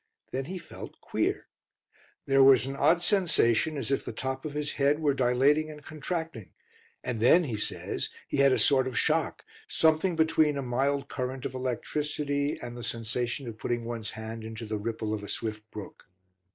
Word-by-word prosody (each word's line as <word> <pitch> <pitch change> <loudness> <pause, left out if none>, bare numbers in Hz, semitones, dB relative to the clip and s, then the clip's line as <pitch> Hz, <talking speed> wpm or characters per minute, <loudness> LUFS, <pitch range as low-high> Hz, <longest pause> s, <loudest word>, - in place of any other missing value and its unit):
Then 135 +1 -2
he 185 +5 -5
felt - - -10
"queer." - - -1 0.8
There 135 0 +5
was 135 -1 +7
an 135 +1 -4
odd 160 +5 +3
sensation 160 - +3
as 140 - -3
if 135 - +1
the - - -5
top 130 +1 -4
of 150 -1 -5
his 150 -1 -1
head 140 +2 +4
were 150 -3 +2
dilating 135 +4 +3
and 150 -1 -10
contracting, 155 - -5 0.5
and 120 -3 -3
then 145 +10 +6
he 125 -8 -3
says 105 - -2 0.2
he - - -2
had 140 0 +5
a - - +3
sort 130 -3 +4
of 130 - -4
shock, - - +1 0.2
something 160 +3 +2
between 160 -2 +3
a 140 - -2
mild 135 +3 0
current 130 -1 -4
of 130 - -3
electricity 145 +3 -2
and 120 0 -7
the 120 - -7
sensation 120 +3 -3
of 110 -2 -7
putting 120 -1 -2
one's 115 -2 -4
hand 110 +1 -7
into 110 +1 -6
the 105 -1 -3
ripple 110 0 -3
of 105 - -3
a 100 - -8
swift 110 -1 -4
brook. 105 -2 -9
135 Hz, 185 wpm, -29 LUFS, 115-150 Hz, 0.8 s, was